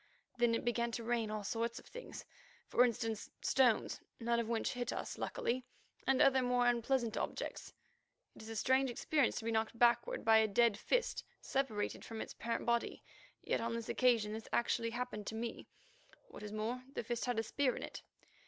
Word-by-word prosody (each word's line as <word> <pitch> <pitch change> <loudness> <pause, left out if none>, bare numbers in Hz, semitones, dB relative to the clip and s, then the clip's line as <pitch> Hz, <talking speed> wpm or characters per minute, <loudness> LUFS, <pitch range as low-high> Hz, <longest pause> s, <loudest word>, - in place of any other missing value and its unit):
Then 235 -1 +4
it - - -3
began 235 0 +1
to 235 - -3
rain 230 -1 0
all 215 -1 -3
sorts 230 +3 -2
of - - -10
things. - - -9 0.4
For 245 - +4
instance, 225 -2 -1
stones, 250 -5 +3 0.2
none 235 0 +1
of 230 -1 -2
which 230 -1 0
hit 245 -1 -2
us, - - -4
luckily, 255 +2 -1 0.4
and 265 0 +4
other 265 -1 +5
more 245 -1 +2
unpleasant 240 0 +2
objects. - - -4 0.6
It - - -12
is 220 - -9
a 225 - -5
strange 260 +5 +3
experience 270 +3 +1
to 225 - -4
be 230 - 0
knocked 220 +1 0
backward 240 0 +3
by 220 -1 +7
a 220 - +4
dead 230 +1 +4
fist 485 - 0 0.2
separated 245 -7 -1
from 225 -1 -7
its - - -5
parent 230 0 -3
body, 235 0 0 0.4
yet - - 0
on 230 0 -1
this 230 -1 -5
occasion 230 -4 +3
this 220 0 -7
actually 235 -1 +1
happened 235 -3 -4
to 220 - -3
me, 230 +1 -4 0.4
and, - - -22
what - - -11
is 210 0 -6
more, 220 +4 -2
the - - -2
fist 240 +2 -2
had 245 -2 -1
a 225 - +1
spear 260 +3 +1
in - - -5
it. - - -7
235 Hz, 200 wpm, -36 LUFS, 225-245 Hz, 0.6 s, by